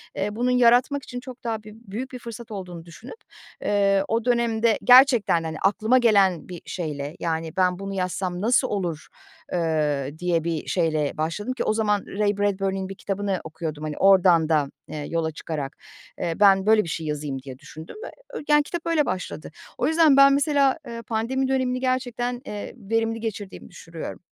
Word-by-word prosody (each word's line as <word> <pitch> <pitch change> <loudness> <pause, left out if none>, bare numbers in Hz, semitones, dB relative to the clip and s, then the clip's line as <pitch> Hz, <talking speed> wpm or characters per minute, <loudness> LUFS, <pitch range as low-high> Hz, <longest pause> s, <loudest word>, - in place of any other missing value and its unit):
eee, 205 +1 -2
bunun 245 +2 +1
yaratmak 250 +3 +4
için 245 - -7
çok 250 -1 -11
daha 225 -2 -3
bü 215 - -11
büyük 230 +3 -7
bir 250 - -7
fırsat 235 -1 -9
olduğunu 180 -5 -7
düşünüp, 170 - -11 0.4
eee, 200 -1 +2
o 225 +1 -1
dönemde 235 -2 +2
gerçekten, 245 -9 +6
hani, 160 -1 -4
aklıma 220 +5 +2
gelen 200 -9 +3
bir 175 -2 -8
şeyle, 150 -3 -5
yani, 160 -1 -3
ben 180 -1 +2
bunu 195 0 -5
yazsam 185 -1 -2
nasıl 245 +4 +3
olur, 175 -8 -3 0.4
eee, 150 -5 0
diye 175 -2 0
bir 165 -2 -3
şeyle 155 -4 0
başladım 170 +10 -2
ki 255 - -3
o - - +1
zaman 210 -2 0
Ray 205 0 0
Bradbury'nin 195 -1 -1
bir 195 - -7
kitabını 195 -1 -2
okuyordum, 155 -1 -6
hani, 155 -1 -4
oradan 180 -4 +5
da, 150 -3 +1 0.2
eee, 150 -1 -6
yola 165 -1 -1
çıkarak. 150 -2 -5 0.4
Eee, 170 - -1
ben 195 -2 +5
böyle 215 0 +5
bir 165 - -7
şey 160 -1 -4
yazayım 145 -3 -3
diye 130 -1 -10
düşündüm 160 +3 -11
ve - - -7 0.2
ö - - -5
yani, 295 0 +5
kitap 345 +3 -5
öyle 330 -3 +2
başladı. 180 - -5 0.3
O - - 0
yüzden 320 -3 +5
ben 275 0 +8
mesela, 280 -1 +2
eee, 230 -1 -6
pandemi 230 +4 -1
dönemini 260 -1 0
gerçekten, 245 -1 -2
eee, 210 -4 -6
verimli 225 +1 -1
geçirdiğimi 210 -4 -6
düşürüyorum. 165 -2 -8
200 Hz, 180 wpm, -24 LUFS, 165-240 Hz, 0.4 s, ben